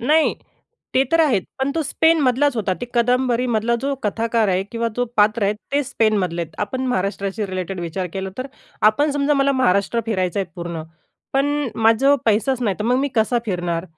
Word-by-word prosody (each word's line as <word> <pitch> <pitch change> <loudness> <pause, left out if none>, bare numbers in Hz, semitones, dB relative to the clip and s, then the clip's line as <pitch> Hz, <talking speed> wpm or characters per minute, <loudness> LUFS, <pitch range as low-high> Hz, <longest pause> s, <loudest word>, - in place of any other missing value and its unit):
नाही, 305 +6 +3 0.6
ते 260 - +5
तर 330 - +5
आहेत. 255 - +3 0.2
पण 265 +1 0
तो 325 - 0
स्पेनमधलाच 290 -3 +2
होता. 200 -4 0
ते 245 - -4
कादंबरीमधला 240 -1 +1
जो 280 - 0
कथाकार 225 +1 0
आहे 185 0 +1
किंवा 230 0 -1
जो 245 - +2
पात्र 215 +1 +3
आहे 200 - +2 0.2
ते 285 - +2
स्पेनमधले 205 -9 0
आहेत. 160 -1 -9
आपण 255 +5 -4
महाराष्ट्राशी 200 -1 -2
रिलेटेड 185 -1 -4
विचार 175 +2 -3
केला 190 0 -4
तर, 255 - -3 0.4
आपण 290 +7 0
समजा 290 +1 +1
मला 275 0 +2
महाराष्ट्र 200 +3 +2
फिरायचं 190 -3 0
आहे 190 - -2
पूर्ण, 170 -2 -5 0.5
पण 275 +1 +2 0.3
माझ्याजवळ 225 +6 +4
पैसाच 235 +4 +1
नाही, 200 -4 0
तर 210 - -3
मग 250 +2 +2
मी 280 - 0
कसा 230 +1 +2
फिरणार? 175 -3 -2
225 Hz, 180 wpm, -21 LUFS, 195-265 Hz, 0.6 s, ते